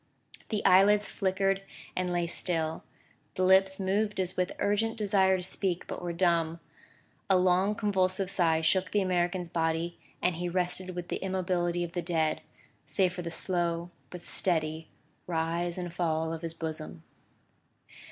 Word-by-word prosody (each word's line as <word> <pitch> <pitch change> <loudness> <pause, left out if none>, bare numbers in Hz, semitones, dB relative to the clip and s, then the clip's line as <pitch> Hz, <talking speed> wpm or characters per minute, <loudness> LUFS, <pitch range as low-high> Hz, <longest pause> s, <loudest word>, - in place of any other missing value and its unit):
The 215 -3 -2
eyelids 205 +3 +6
flickered 195 0 0 0.3
and 180 -1 -1
lay 175 -1 +1
still; 165 -2 -1 0.5
the 185 - 0
lips 190 +1 +4
moved 205 +2 0
as 185 -1 +1
if - - -17
with 180 0 0
urgent 220 +3 0
desire 195 -3 +3
to 180 - -4
speak, 185 -1 -1
but - - -6
were 175 -1 -3
dumb; 170 -2 +1 0.7
a 190 - +6
long 185 +3 +3
convulsive 190 -2 +1
sigh 165 -3 +3
shook 185 +3 +2
the 205 - +2
American's 180 -1 0
body; 165 +1 -1 0.2
and 180 -2 0
he 175 +1 -2
rested 180 +1 -1
with 175 -1 -5
the - - -1
immobility 180 -2 0
of 170 - -5
the 175 - -2
dead, 160 -3 0 0.5
save 185 -3 +1
for 180 - -5
the 170 - -4
slow 175 -1 -1 0.2
but 180 -1 -9
steady 160 -4 -1 0.4
rise 170 +1 -1
and 175 -2 -4
fall 160 -2 0
of 165 - -5
his 165 -1 -5
bosom. 120 - -5
180 Hz, 160 wpm, -29 LUFS, 170-190 Hz, 0.7 s, eyelids